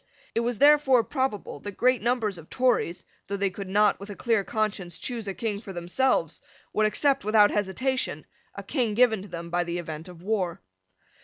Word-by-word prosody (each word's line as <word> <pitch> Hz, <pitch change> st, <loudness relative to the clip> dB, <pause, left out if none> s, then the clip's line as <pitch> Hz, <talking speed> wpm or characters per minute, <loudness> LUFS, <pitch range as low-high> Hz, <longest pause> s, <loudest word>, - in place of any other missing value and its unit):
It -, -, +1 dB
was 235 Hz, 0 st, -1 dB
therefore 285 Hz, -3 st, +5 dB
probable 260 Hz, -5 st, -3 dB
that 205 Hz, -2 st, -8 dB
great 255 Hz, 0 st, +3 dB
numbers 225 Hz, -5 st, 0 dB
of 160 Hz, -, -14 dB
Tories, 240 Hz, -9 st, +1 dB, 0.2 s
though 200 Hz, -, -3 dB
they 195 Hz, -1 st, 0 dB
could 195 Hz, 0 st, -7 dB
not, 205 Hz, +1 st, +3 dB
with 200 Hz, +1 st, -9 dB
a 205 Hz, -, -6 dB
clear 225 Hz, -3 st, +1 dB
conscience, 200 Hz, -6 st, -2 dB
choose 235 Hz, -4 st, -4 dB
a 195 Hz, -, -2 dB
King 210 Hz, +1 st, -3 dB
for 195 Hz, -4 st, -8 dB
themselves, 175 Hz, -, 0 dB, 0.3 s
would 215 Hz, 0 st, +3 dB
accept, 275 Hz, +5 st, +1 dB
without 210 Hz, 0 st, +5 dB
hesitation, 255 Hz, +7 st, -1 dB, 0.3 s
a -, -, -7 dB
King 235 Hz, -7 st, -1 dB
given 225 Hz, -4 st, +4 dB
to 200 Hz, -, -10 dB
them 170 Hz, -2 st, -7 dB
by 175 Hz, 0 st, +1 dB
the 170 Hz, 0 st, -3 dB
event 160 Hz, -1 st, -6 dB
of 175 Hz, -1 st, -12 dB
war. 190 Hz, -5 st, -1 dB
210 Hz, 190 wpm, -26 LUFS, 185-240 Hz, 0.3 s, therefore